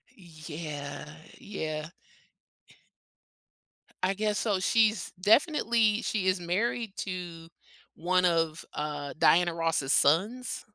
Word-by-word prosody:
Yeah, 155 -5 -7 0.3
yeah. 155 -5 -5 2.1
I 185 +1 +1
guess 210 +1 -1
so. 205 -4 0
She's 215 +1 +2
definitely, 225 - +3
she 200 -5 -1
is 185 0 +2
married 205 +5 -1
to 175 -3 -6 0.5
one 180 +2 +1
of, 165 -2 0
uh, 145 -1 -4
Diana 175 0 +4
Ross's 165 -5 0
sons. 210 - +1
180 Hz, 95 wpm, -28 LUFS, 160-210 Hz, 2.1 s, Diana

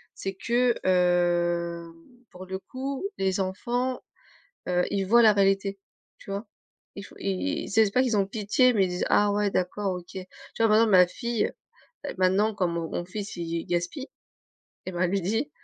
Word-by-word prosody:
C'est 195 0 -5
que, 240 +3 +2
hem, 175 -2 +1 0.4
pour 185 +1 -10
le 190 +1 -5
coup 270 - -5
les 190 0 0
enfants, 245 +7 -2 0.7
heu, 180 0 +2
ils 195 -1 0
voient 235 +4 +6
la 215 -2 +7
réalité, 195 0 +1 0.4
tu - - -12
vois? 200 +3 -4 0.5
Il - - -6
faut - - -14
ils 200 +11 -2
ils - - -8
c'est 220 +2 +5
c'est 200 - -1
pas 255 - +3
qu'ils 240 -4 +1
ont 200 - +3
pitié 220 +5 +2
mais 200 -5 +3
ils - - -4
disent: 180 +1 -2
«Ah 205 0 +4
ouais 205 0 +1
d'accord, 190 +1 -1
OK». 180 -1 -9
Tu - - -4 0.4
vois, 225 - +4
par 215 - +5
exemple 225 -2 +4
ma 180 -1 +7
fille, 235 +4 -2 0.6
heu, - - -4
maintenant 195 +4 +3
comme 180 -4 -1
mon 165 -1 -3
mon - - -3
fils 205 +2 -6
il 170 - -4 0.2
il - - -12
gaspille, 175 - -2 0.8
et 185 - -4
ben, 175 - -5
elle 180 - +2
lui 195 -1 0
dit: 225 - -1
195 Hz, 200 wpm, -26 LUFS, 180-220 Hz, 0.8 s, la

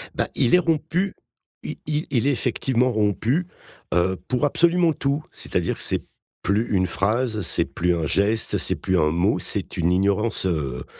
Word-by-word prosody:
Bah, - - -1
il 125 - +3
est - - +5
rompu 165 +3 -1 0.5
I - - -6
i 150 +1 -2
il 130 0 +1
est - - +4
effectivement 130 -1 +2
rompu, 110 - 0 0.5
heu, 90 +2 +1
pour 130 +3 0
absolument 170 +2 +3
tout. 140 +2 -1
C'est-à-dire - - -2
que - - 0
c'est - - 0 0.4
plus 105 +5 0
une 95 -1 +2
phrase, 110 +5 0
c'est 90 - +2
plus 90 0 -1
un 80 -2 -2
geste, 105 +8 +1
c'est - - 0
plus 95 -2 0
un 75 0 +2
mot, 90 +6 +1
c'est 100 -1 -2
une 85 0 +1
ignorance, 100 +3 +1
heu, 70 -8 -2
110 Hz, 175 wpm, -23 LUFS, 95-140 Hz, 0.5 s, est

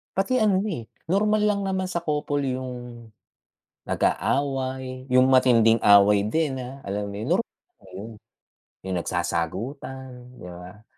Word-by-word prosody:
Pati 195 +7 +1
ano, 195 -3 +3
eh, 120 - -5 0.2
normal 210 +4 +2
lang 200 -1 +1
naman 190 -1 -1
sa 175 -2 -3
couple 150 -2 -1
'yung 125 -2 -5 0.8
nag-aaway, 130 -2 -1
'yung 130 0 +5
matinding 120 -4 +5
away 100 0 +6
din, 140 +5 0
ah, 130 +3 -9
alam 100 +1 -3
mo - - -8
'yun, 110 - -4
normal - - -8
'yun, 110 +4 -8 0.7
'yung 95 -1 -2
nagsasagutan, 125 - -4
di - - -12
ba? 90 +4 -11
130 Hz, 130 wpm, -24 LUFS, 105-145 Hz, 0.8 s, away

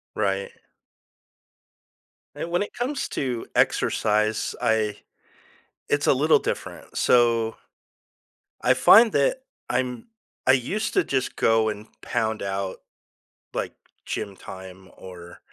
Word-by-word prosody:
Right. 100 -2 -1 1.8
And 170 - -5
when 175 +3 +1
it 205 - -6
comes 275 +3 -2
to 125 -4 -3
exercise, 110 +1 +1
I 110 -2 +1 0.9
It's 145 0 +1
a - - +5
little 150 +4 +4
different, - - -5
so 115 -2 +3 1.1
I 130 - +4
find 215 - +7
that - - +2 0.3
I'm 125 - -2 0.4
I 130 - +7
used 135 - -1
to - - +4
just 130 -4 -2
go 115 -1 +3
and 105 0 -7 0.2
pound 110 -2 -1
out, 95 -1 -3 0.8
like, - - -3 0.3
gym 100 - -4
time 95 0 -11
or 90 -2 -11
115 Hz, 110 wpm, -24 LUFS, 105-135 Hz, 1.8 s, find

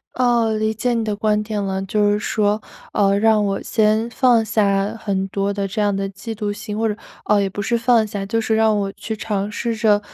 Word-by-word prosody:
哦， 240 -3 +2
理 215 0 +1
解 245 +3 0
你 230 -1 0
的 210 -1 -2
观 210 0 +1
点 210 -1 -3
了， 190 0 -2
就 205 +1 +1
是 205 - +1
说， 210 0 0 0.3
呃 200 -1 +2
让 215 0 +3
我 195 -1 -1
先 220 0 +2
放 240 -3 +3
下 205 -1 +1
很 195 -3 -2
多 200 +1 -1
的 200 -1 -2
这 205 +2 -3
样 205 -1 +1
的 195 0 -2
嫉 225 +3 -7
妒 205 -1 -2
心 210 +1 -6
或 225 0 +1
者， 210 - -1 0.3
呃， 210 -1 +3
也 195 - 0
不 205 +2 -5
是 235 - 0
放 230 -1 +3
下， 205 -1 -5
就 210 +3 -1
是 220 0 0
让 220 -1 +3
我 195 -1 -2
去 220 +2 -6
尝 205 -1 -2
试 230 +1 -2
着 215 -2 +3
210 Hz, 250 characters per minute, -20 LUFS, 200-225 Hz, 0.3 s, 让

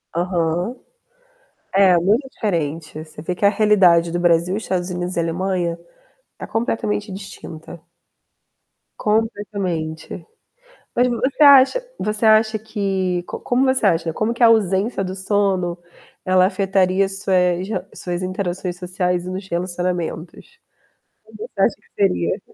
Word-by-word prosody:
Aham. 175 +4 -1 1.0
É, 190 -2 +5
muito 215 - +1
diferente, 160 -5 -3
você 155 -1 -12
vê 180 +3 -3
que 200 - -4
a - - +8
realidade 190 -6 +4
do 175 - -2
Brasil, 175 +2 +2
Estados 185 -4 -2
Unidos 180 0 -4
e - - +2
Alemanha, 170 0 -1 0.6
tá - - -7
completamente 215 -2 -2
distinta. 170 -4 -9 1.2
Completamente. 200 -7 -2 0.7
Mas 245 +1 +3
você 260 +5 0
acha 280 - +6
você 215 +1 -1
acha 220 0 +4
que 195 -4 -2
co - - -5
como 250 +2 +1
você 260 -4 +2
acha, 165 -3 +1
como 220 +7 -1
que 240 - -4
a - - +9
ausência 200 -1 +2
do 185 0 -4
sono 190 -2 0 0.5
ela 185 0 +4
afetaria 195 0 +1
as 195 0 -5
suas 180 0 +1
rel 220 - -3
suas 175 0 -4
interações 185 -1 -3
sociais 180 -1 -2
e 180 - -5
nos 190 +1 -5
relacionamentos? 175 - -4 0.7
Como - - -15
você 455 +3 -5
acha - - +3
que - - -30
seria? 90 - +1
185 Hz, 135 wpm, -20 LUFS, 175-210 Hz, 1.2 s, a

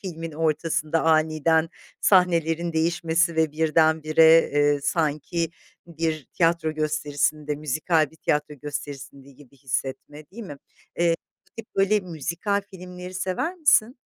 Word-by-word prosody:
filmin 165 -4 -6
ortasında 155 0 -1
aniden 160 0 +2 0.3
sahnelerin 170 -3 +2
değişmesi 165 +1 +1
ve 160 -2 +1
birdenbire, 160 +1 +4
eee, 145 0 +2
sanki 160 +2 -1 0.4
bir 160 -3 -3
tiyatro 165 -2 +1
gösterisinde 150 -1 -1
müzikal 155 +1 0
bir 160 - -20
tiyatro 150 -1 -1
gösterisinde 140 -1 -8
gibi 140 0 -19
hissetme, 135 +3 -5
değil 230 +4 -9
mi? 150 -9 -8 0.4
Eee, 170 -1 +2 0.3
bu - - -50
tip 225 -1 -10
böyle 195 +2 +3
müzikal 175 +4 -3
filmleri 180 -1 -10
sever 190 - -2
misin? 280 -8 +3
160 Hz, 120 wpm, -24 LUFS, 150-170 Hz, 0.4 s, birdenbire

